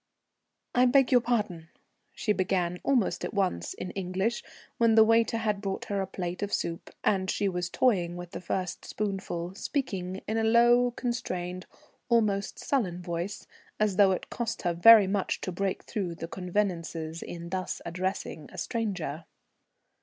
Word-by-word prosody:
"I 250 Hz, +1 st, +5 dB
beg 265 Hz, 0 st, +4 dB
your 250 Hz, -2 st, +6 dB
pardon," 210 Hz, -9 st, -1 dB, 0.5 s
she 220 Hz, -3 st, +1 dB
began 180 Hz, -2 st, 0 dB
almost 255 Hz, -7 st, +1 dB
at -, -, -4 dB
once 185 Hz, -, 0 dB
in 185 Hz, -, -5 dB
English, 190 Hz, +5 st, -1 dB, 0.4 s
when 230 Hz, -1 st, +5 dB
the 220 Hz, -, +9 dB
waiter 225 Hz, +1 st, +3 dB
had 210 Hz, -3 st, -1 dB
brought 195 Hz, -2 st, -3 dB
her 200 Hz, -1 st, -1 dB
a 190 Hz, -, -2 dB
plate 180 Hz, 0 st, -4 dB
of 205 Hz, 0 st, -2 dB
soup, 170 Hz, 0 st, -2 dB
and 190 Hz, -2 st, +1 dB
she 205 Hz, -, +1 dB
was 180 Hz, -2 st, -2 dB
toying 175 Hz, -9 st, +1 dB
with 175 Hz, -1 st, -8 dB
the -, -, -6 dB
first 180 Hz, +1 st, -3 dB
spoonful, 190 Hz, -4 st, -3 dB
speaking 190 Hz, -6 st, -3 dB
in 220 Hz, -, -1 dB
a -, -, +1 dB
low 240 Hz, +2 st, +5 dB
constrained, 185 Hz, -8 st, -4 dB, 0.4 s
almost 210 Hz, -4 st, +2 dB
sullen 180 Hz, -10 st, -1 dB
voice, 175 Hz, +3 st, -4 dB, 0.3 s
as 210 Hz, -3 st, +1 dB
though 200 Hz, -2 st, +7 dB
it 185 Hz, -, -3 dB
cost 235 Hz, -1 st, -3 dB
her 175 Hz, -2 st, +1 dB, 0.3 s
much 195 Hz, 0 st, -1 dB
to 185 Hz, -, -3 dB
break 190 Hz, +2 st, -2 dB
through 190 Hz, -6 st, -3 dB
the 165 Hz, -, -6 dB
convenances 170 Hz, -3 st, -2 dB
in 170 Hz, 0 st, -7 dB
thus 185 Hz, 0 st, -3 dB
addressing 180 Hz, -3 st, -3 dB
a -, -, -12 dB
stranger. 180 Hz, -, -3 dB
195 Hz, 160 wpm, -28 LUFS, 175-225 Hz, 0.5 s, the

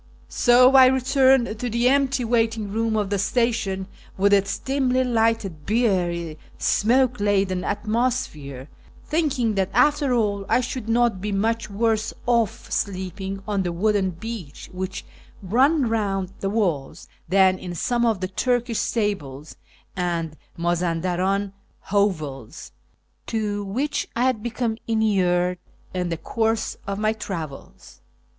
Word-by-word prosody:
So 250 Hz, +1 st, +5 dB
I 260 Hz, -1 st, +9 dB
returned 260 Hz, -3 st, +3 dB
to 245 Hz, -, -2 dB
the 235 Hz, +2 st, +1 dB
empty 270 Hz, -1 st, +2 dB
waiting 225 Hz, -3 st, 0 dB
room 225 Hz, +1 st, 0 dB
of 205 Hz, -2 st, -1 dB
the 200 Hz, -, +1 dB
station, 220 Hz, -3 st, 0 dB, 0.3 s
with 200 Hz, +1 st, +3 dB
its 200 Hz, 0 st, +2 dB
dimly 260 Hz, -1 st, +1 dB
lighted, 225 Hz, -9 st, 0 dB
beery, 175 Hz, -8 st, 0 dB, 0.2 s
smoke 245 Hz, +2 st, +2 dB
laden 195 Hz, -3 st, +1 dB
atmosphere, 205 Hz, -, -2 dB, 0.4 s
thinking 285 Hz, -8 st, 0 dB
that 195 Hz, -2 st, 0 dB
after 290 Hz, +2 st, +3 dB
all 210 Hz, -4 st, +1 dB
I -, -, +4 dB
should 250 Hz, -2 st, -4 dB
not 230 Hz, -4 st, +2 dB
be 210 Hz, +1 st, -3 dB
much 225 Hz, +3 st, 0 dB
worse 220 Hz, +1 st, 0 dB
off 235 Hz, -1 st, 0 dB
sleeping 195 Hz, 0 st, -3 dB
on 205 Hz, -2 st, 0 dB
the 175 Hz, -2 st, -2 dB
wooden 195 Hz, +2 st, +1 dB
bench 180 Hz, -4 st, -8 dB
which 185 Hz, +1 st, -5 dB, 0.4 s
ran 260 Hz, -, +3 dB
round 195 Hz, -4 st, -1 dB
the 195 Hz, -, -2 dB
walls, 180 Hz, -11 st, -2 dB, 0.2 s
than 190 Hz, 0 st, +4 dB
in 175 Hz, -1 st, -6 dB
some 240 Hz, +7 st, 0 dB
of 225 Hz, -5 st, +1 dB
the 185 Hz, -, -1 dB
Turkish 240 Hz, +3 st, 0 dB
stables 155 Hz, -, -2 dB, 0.4 s
and 170 Hz, -4 st, -2 dB, 0.2 s
Mazandarani 180 Hz, +3 st, 0 dB, 0.4 s
hovels 155 Hz, -, -1 dB, 0.6 s
to 210 Hz, -2 st, -2 dB
which 270 Hz, +9 st, -2 dB
I 235 Hz, -, +1 dB
had 255 Hz, -4 st, +1 dB
become 235 Hz, -1 st, -2 dB
inured 180 Hz, -5 st, +1 dB, 0.3 s
in 180 Hz, -1 st, -2 dB
the 165 Hz, -, -2 dB
course 225 Hz, +5 st, -1 dB
of 200 Hz, 0 st, -2 dB
my 215 Hz, +1 st, +1 dB
travels. 165 Hz, -10 st, -8 dB
210 Hz, 130 wpm, -23 LUFS, 185-235 Hz, 0.6 s, I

